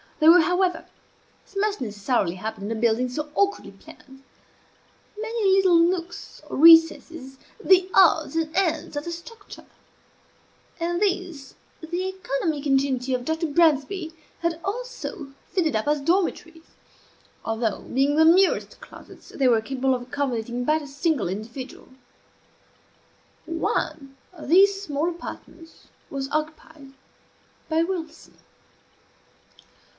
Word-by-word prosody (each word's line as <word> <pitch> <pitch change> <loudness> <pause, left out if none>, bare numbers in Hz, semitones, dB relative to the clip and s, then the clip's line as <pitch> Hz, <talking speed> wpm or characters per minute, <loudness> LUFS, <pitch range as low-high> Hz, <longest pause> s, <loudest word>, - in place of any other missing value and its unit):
There 315 +1 +7
were, 355 0 +7
however 360 +2 0 0.6
(as - - -24
must 410 -4 -1
necessarily 205 -4 -1
happen 200 +1 -6
in 225 - -2
a - - -5
building 235 +2 +1
so 295 +4 -5
awkwardly 400 0 0
planned) 270 0 -17 1.0
many 450 -3 0
little 375 -3 +4
nooks 345 0 -1
or - - -6
recesses, 325 -3 +5 0.3
the 370 0 +4
odds 320 -4 +4
and 325 -1 -2
ends 330 -5 -1
of 290 - -3
the 340 - -6
structure; 410 +6 -11 1.1
and 345 +2 -2
these 365 -8 -2 0.3
the 350 +3 -3
economic 315 -5 -3
ingenuity 270 -2 0
of 250 -1 -2
Dr. 320 +1 -1
Bransby 320 +2 +1 0.3
had 335 -1 -2
also 410 - -6
fitted 325 - -1
up 215 +3 -1
as 295 -1 +1
dormitories; 335 0 -1 0.8
although, 225 -1 -2
being 275 +3 0
the 320 +1 +5
merest 365 +4 +3
closets, - - -14
they 270 - 0
were 230 -3 +3
capable 265 +2 -1
of 245 - -6
accommodating 245 -3 -3
but 310 +2 +2
a - - -9
single 285 - -1
individual. 230 +7 -8 1.6
One 305 -4 -3 0.2
of 315 -5 -10
these 390 +3 +5
small 310 -2 -2
apartments 330 -1 -11 0.2
was 270 -1 -5
occupied 310 -2 -5 0.8
by 320 +1 +2
Wilson. 335 -3 -6
315 Hz, 125 wpm, -24 LUFS, 270-350 Hz, 1.6 s, There